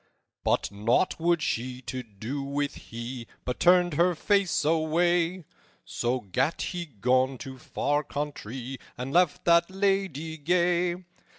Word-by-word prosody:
"But - - +1
nought 110 - +1
would 170 -1 +2
she 125 0 -2
to 125 +2 -4
do 115 +5 -6
with 140 +1 -2
he, 120 +1 -7 0.2
But 125 - -3
turned 180 -1 +5
her 175 +4 +3
face 195 -3 +2
away; 165 +2 +2 0.4
So 125 +2 -1
gat 130 - -1
he 175 -2 -4
gone 130 +2 +1
to 130 0 -8
far 145 +4 -1
countrye, 135 -3 -5 0.2
And 130 +3 -4
left 175 -3 +3
that 170 0 +5
lady 190 -5 -1
gay. 175 +2 +2
145 Hz, 130 wpm, -27 LUFS, 125-175 Hz, 0.4 s, turned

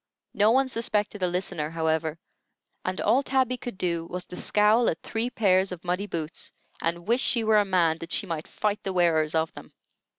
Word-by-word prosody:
No 210 +1 +4
one 265 +3 +3
suspected 210 -4 -2
a 180 - +2
listener, 175 -3 -2
however, 160 -1 -1 0.7
and 185 0 -3
all 260 - +3
Tabby 260 -2 +1
could 245 -5 -7
do 170 -2 -1
was 180 +1 -5
to - - -7
scowl 215 +5 +3
at 160 - -4
three 230 +2 -2
pairs 190 -5 +2
of 180 -1 -7
muddy 180 +3 -2
boots, 165 -3 -5 0.3
and 170 +2 -2
wish 240 +3 +3
she 235 -3 +2
were 215 -1 +4
a 205 - +2
man 170 -4 +2
that 165 +2 -8
she - - +2
might 165 -4 -4
fight 210 -1 -2
the 195 - -3
wearers 165 -3 +2
of 160 0 0
them. - - -12
185 Hz, 200 wpm, -26 LUFS, 165-215 Hz, 0.7 s, No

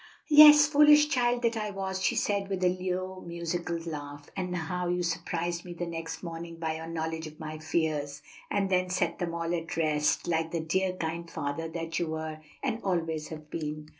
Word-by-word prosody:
"Yes, 300 0 +10
foolish 300 0 +6
child 245 -3 +1
that 235 0 +2
I 215 -1 -2
was!" 190 -1 -3
she - - +2
said, 200 -5 0
with 190 -2 -2
a 180 - +5
low 185 +1 -3
musical 170 0 -3
laugh; 145 -3 -7
"and 180 -1 -3
how 180 +1 -2
you 180 0 0
surprised 170 0 -2
me 175 -1 -8
the 175 - -3
next 165 0 -6
morning 170 0 -6
by 160 -1 -2
your 160 0 -7
knowledge 160 -1 -3
of 155 0 -13
my 155 0 -6
fears, 150 -3 -1 0.3
and 195 -1 0
then 185 0 +2
set 175 -2 0
them 170 -1 -2
all 170 0 -2
at 165 -1 -3
rest, 155 -1 +1
like 165 -1 0
the 170 - -2
dear, 185 +4 0
kind 170 -1 -4
father 145 +3 -3
that 165 0 -3
you 170 - -1
were 160 0 -4 0.2
and 225 - -1
always 165 -5 -1
have 155 -1 -10
been." 155 -1 -5
170 Hz, 195 wpm, -29 LUFS, 160-185 Hz, 0.3 s, Yes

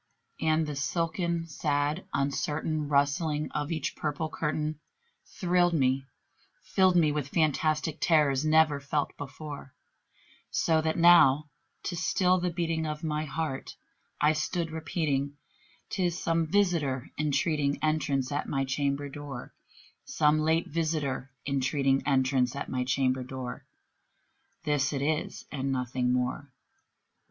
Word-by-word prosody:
And 160 0 +2
the 150 -1 -4
silken 170 +3 -1
sad 150 +1 -1
uncertain 150 +2 -1
rustling 150 +2 +1
of 150 +2 -3
each 155 -4 -2
purple 150 +1 -2
curtain 155 -1 -2 0.5
Thrilled 175 -1 +2
me 135 -1 +1 0.6
filled 185 -1 +3
me 160 -4 +4
with 145 -2 -2
fantastic 155 0 +1
terrors 150 -4 +3
never 155 -2 +4
felt 145 +1 -2
before; 145 -1 -8 0.7
So 160 -1 +2
that 160 0 -1
now, 155 -4 +6 0.3
to 175 - -3
still 180 +1 +2
the 180 0 0
beating 165 -2 -1
of 150 0 -5
my 155 -1 -1
heart, 150 -2 -4 0.4
I 150 +1 +4
stood 165 +2 -2
repeating 145 -3 -2 0.5
"'Tis 180 -4 0
some 165 -2 0
visitor 160 -9 +1
entreating 150 -1 +1
entrance 145 -4 0
at 145 +1 -2
my 135 -1 0
chamber 140 +1 -1
door 140 -3 -8 0.5
Some 150 0 +2
late 160 +2 +2
visitor 150 -5 -2 0.2
entreating 135 0 +1
entrance 130 -2 +2
at 140 - -4
my 125 -1 -1
chamber 130 0 +1
door; 130 -1 -6 1.0
This 145 -1 +1
it 140 -1 -1
is 155 +2 -2
and 135 -1 -2
nothing 125 -1 0
more." 125 +3 -1
150 Hz, 125 wpm, -29 LUFS, 140-160 Hz, 1.0 s, now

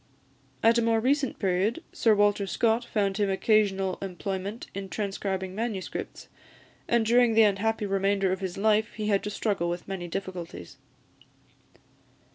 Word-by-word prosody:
At 230 +1 +5
a - - +2
more 230 -1 +2
recent 270 +3 +1
period, 195 - 0
Sir 225 -2 +3
Walter 205 -1 +2
Scott 230 +3 +1
found 200 -4 -1
him 205 -2 +1
occasional 195 -2 +1
employment 195 +3 -4
in 195 0 -6
transcribing 195 -2 -3
manuscripts; 215 -2 -5 0.6
and 235 -1 +2
during 235 0 +4
the 225 - +7
unhappy 210 +1 +1
remainder 195 -1 +1
of 190 - -1
his 190 -2 -4
life 215 +2 +2
he 215 -1 -3
had 200 -2 +2
to - - -2
struggle 200 -4 -1
with 175 0 -5
many 190 -3 -5
difficulties. 175 - -6
200 Hz, 145 wpm, -27 LUFS, 190-225 Hz, 0.6 s, the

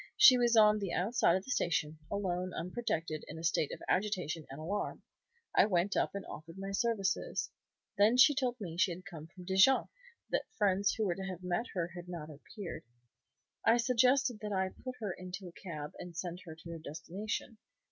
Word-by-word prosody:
She 270 -11 +10
was 240 -1 +3
on 215 -1 +6
the 195 -4 -3
outside 195 -1 +3
of 190 - -2
the 265 - -5
station, 155 -8 0
alone, 185 -2 -2
unprotected, 165 -5 -2
in 155 - -8
a 160 - -7
state 160 -3 +1
of - - -7
agitation 180 -6 0
and 135 - -8
alarm. 200 +6 -3 0.5
I - - +6
went 190 0 +1
up - - +1
and 200 - -4
offered 165 +3 -9
my 195 0 -5
services. 225 - 0 0.5
Then 215 +4 +5
she 290 +3 +8
told 255 -3 0
me 170 -5 -6
she 190 - +4
had 185 +2 -11
come 160 -5 -9
from 180 +2 -13
Dijon, 190 +8 +5 0.4
that - - 0
friends 200 -2 +2
who 220 - 0
were 180 - +1
to 190 +2 -6
have 185 -1 -6
met 180 +6 -1
her 175 -2 -1
had 175 0 -8
not 160 -3 -6
appeared. 160 +3 -8 0.8
I 225 +1 +5
suggested 250 0 +3
that 210 0 -5
I 190 -1 +1
should - - -20
put 255 -1 -5
her 205 -4 -2
into 185 +1 -7
a - - -9
cab 155 -5 -7
and 175 -2 -8
send 175 +1 -4
her 160 -2 -8
to 165 +1 -10
her 165 - -6
destination. 180 +9 -5
190 Hz, 200 wpm, -33 LUFS, 170-215 Hz, 0.8 s, She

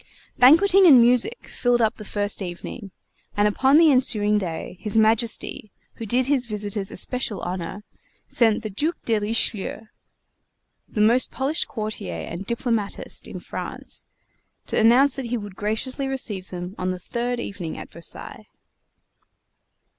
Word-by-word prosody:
Banqueting 365 +9 +6
and 270 -6 +9
music 250 - +2
filled 245 -1 +1
up 225 0 +1
the 215 - -9
first 205 0 -2
evening; 190 +3 -7 0.5
and 205 0 +4
upon 265 +7 +3
the 320 -2 +6
ensuing 215 -6 +3
day 175 -2 -5
His 215 0 -2
Majesty, 220 -1 +1 0.3
who 225 - -6
thus - - -15
did 250 +3 +2
his 265 -3 +1
visitors 205 -2 -2
especial 230 -1 -1
honor, 185 +3 -5 0.4
sent 225 -2 +2
the 215 - -5
Duc 310 - -1
de 225 -2 +1
Richelieu, 210 -1 0 1.1
the 210 - -2
most 235 +4 +4
polished 275 +4 -1
courtier 215 - -5
and 170 - -6
diplomatist 230 -3 -3
in - - -7
France, - - -7 0.6
to - - 0
announce 250 +5 +5
that 265 - -4
he 240 +1 -2
would 205 -3 -8
graciously 240 +7 -2
receive 215 -8 -3
them 180 +1 -6
on 185 - -1
the 185 - -2
third 240 +6 -3
evening 185 -8 -6
at - - -9
Versailles. 170 0 -5
220 Hz, 145 wpm, -23 LUFS, 205-250 Hz, 1.1 s, and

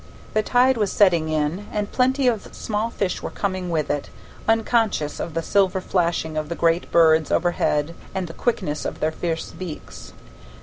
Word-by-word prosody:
The 215 - +3
tide 250 +3 +3
was 210 -3 +1
setting 170 -6 +3
in, 155 +6 -1
and 210 -1 -2
plenty 260 +1 +2
of 225 -4 0
small 215 +1 -2
fish 195 -5 -2
were - - -4
coming 185 -2 -3
with 160 -3 0
it, 145 -1 -3 0.4
unconscious 225 -8 +1
of 165 - -5
the 165 - -1
silver 190 0 +2
flashing 170 -4 -1
of 155 0 -2
the 170 - -3
great 170 +1 +1
birds 160 -2 +4
overhead 165 -3 +1 0.2
and 190 -1 -1
the 165 - -8
quickness 155 -11 -1
of - - -4
their 155 - +1
fierce 165 0 -3
beaks. 180 -5 -8
180 Hz, 175 wpm, -23 LUFS, 160-210 Hz, 0.4 s, birds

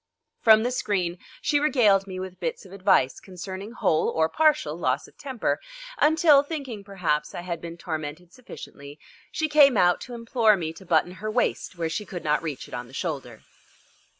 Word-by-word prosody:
From 220 -1 +6
the 245 - 0
screen 185 -8 -1 0.2
she 295 -1 +2
regaled 215 -10 +3
me 185 -1 -6
with 185 -1 -7
bits 480 - -4
of 185 - -14
advice 185 -9 +2
concerning 190 +3 -8
whole 160 -9 +1
or 160 0 +1
partial 300 - +2
loss 140 -4 -1
of - - -21
temper, 265 -5 -2 0.4
until, 310 -1 +5
thinking, 280 -8 -6
perhaps, 175 -7 -2
I - - -4
had 170 -2 -5
been 170 0 -8
tormented 160 +1 -6
sufficiently, 145 - -11 0.3
she 315 - -1
came 290 -5 +6
out 180 -1 +3
to 245 - -7
implore 230 -2 +3
me 160 -3 -4
to 190 +2 -14
button 170 +1 +2
her 190 +4 -6
waist 215 -4 -1
where 165 -1 -1
she 200 +5 -4
could 175 -2 -7
not 150 0 +1
reach 150 -5 -5
it - - -15
on 120 0 -5
the 130 - -17
shoulder. 135 - -5
185 Hz, 185 wpm, -25 LUFS, 160-240 Hz, 0.4 s, From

